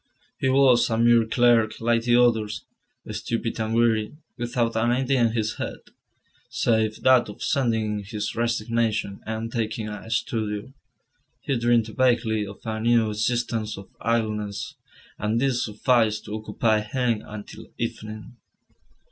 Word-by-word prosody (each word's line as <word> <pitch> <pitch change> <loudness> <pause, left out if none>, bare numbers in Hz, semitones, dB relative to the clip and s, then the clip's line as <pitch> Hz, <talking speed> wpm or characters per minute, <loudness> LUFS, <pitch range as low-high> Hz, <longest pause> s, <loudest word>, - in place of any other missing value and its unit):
He 130 - +1
was 130 -3 +5
a 115 - 0
mere 115 -1 +4
clerk 115 -2 +3
like 115 0 +2
the 120 -1 +4
others, 110 -4 +2 0.5
stupid 115 0 -3
and 110 +1 -1
weary, 115 +2 +1 0.2
without 120 -1 -1
an 115 +1 +2
idea 130 +1 +1
in 115 -1 +2
his 110 -1 -1
head, - - -4 0.7
save 110 -2 0
that 130 -3 +5
of 105 - -8
sending 110 -5 0
in - - -8
his 105 +1 -4
resignation 115 -3 -1
and 110 +1 -3
taking 110 -1 -2
a 105 +1 -8
studio. 110 +1 -2 0.7
He 135 - -1
dreamed 120 -1 +3
vaguely 115 -5 +2
of 100 0 -11
a 110 -1 -3
new 115 -1 +3
existence 110 0 -1
of 100 - -12
idleness, 110 -2 -1 0.5
and 110 +2 0
this 130 -1 +1
sufficed 110 0 +1
to 105 - -7
occupy 110 0 0
him 115 0 -1
until 110 +1 -10
evening. 110 0 -6
115 Hz, 140 wpm, -24 LUFS, 110-120 Hz, 0.7 s, was